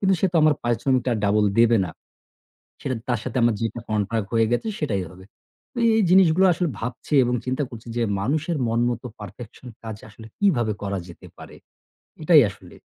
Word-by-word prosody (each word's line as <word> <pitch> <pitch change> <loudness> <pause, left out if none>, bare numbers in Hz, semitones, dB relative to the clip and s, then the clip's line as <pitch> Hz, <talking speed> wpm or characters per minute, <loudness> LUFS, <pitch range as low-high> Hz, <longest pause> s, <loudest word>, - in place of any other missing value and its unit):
কিন্তু 190 -1 +3
সে 195 - +3
তো - - +1
আমার 155 -1 +5
পরিশ্রমটা 120 +2 0
আর - - -2
double 105 0 +3
দেবে 115 -1 +5
না। - - -7 0.9
সেটা 130 - -2
তার 120 -2 +1
সাথে - - -5
আমার 115 -2 +3
যেটা 115 +1 -3
contract 105 0 -1
হয়ে 115 -1 +3
গেছে 170 - -1
সেটাই 100 -11 -1
হবে। 95 +1 -14 0.5
তো - - -6 0.2
এই - - +3
জিনিসগুলো 185 -1 +5
আসলে 175 0 -1
ভাবছি 125 +5 -5
এবং 125 +1 0
চিন্তা 130 +3 -1
করছি 115 0 -11
যে 120 - +1 0.2
মানুষের 155 - -1
মন 115 +1 0
মতো 120 +1 -5
perfection 110 +5 -11 0.2
কাজ 110 -2 -6
আসলে 110 +1 -13
কিভাবে 125 - +2
করা 100 -1 -2
যেতে 85 - -13
পারে? - - -12 0.7
এটাই 155 -2 +7
আসলে। - - -16
120 Hz, 185 wpm, -23 LUFS, 110-150 Hz, 0.9 s, এটাই